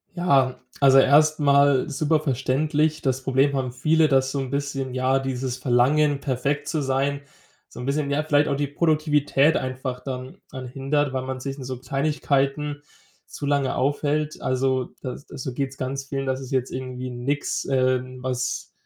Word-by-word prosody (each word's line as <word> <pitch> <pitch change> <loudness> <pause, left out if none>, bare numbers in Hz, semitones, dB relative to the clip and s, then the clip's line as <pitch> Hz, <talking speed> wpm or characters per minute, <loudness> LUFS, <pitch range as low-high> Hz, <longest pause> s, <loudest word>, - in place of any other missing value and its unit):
Ja, 140 -8 +2 0.2
also 135 -1 +6
erstmal 145 -1 +4
super 155 +2 +1
verständlich. 150 +3 0
Das 130 -1 0
Problem 135 +2 +2
haben 130 -2 -2
viele, 155 +5 +3
dass 135 -2 +2
so 140 - -2
'n 135 - -3
bisschen 140 -1 -3
ja, 130 +1 +2
dieses 130 -1 -3
Verlangen, 135 +3 +2
perfekt 140 +2 -1
zu 155 -2 -1
sein, 135 +1 0 0.5
so - - -10
'n - - -5
bisschen, 140 +1 -1
ja, 145 +2 0
vielleicht 150 -1 +3
auch 140 - 0
die 145 +1 -1
Produktivität 150 -1 +2
einfach 130 0 -4
dann 130 -1 -6
dran 130 -1 -7
hindert, 135 +2 -1
weil 130 -1 -2
man 130 0 -5
sich 135 +1 -5
in 135 - -7
so 130 -1 -5
Kleinigkeiten 145 0 -1 0.4
zu 145 - -7
lange 140 -2 +1
aufhält. 145 +3 -1
Also, 130 0 0
das 130 +3 -6
das 135 -5 -8
so 130 - -4
geht's 135 +1 -3
ganz 135 +1 -4
vielen, 135 0 -3
das 130 0 -1
ist 130 -1 -9
jetzt 130 -2 0
irgendwie 130 0 -5
nix, 130 +4 -2
ähm, 130 -1 0
was 125 -1 -2
135 Hz, 170 wpm, -24 LUFS, 130-145 Hz, 0.5 s, also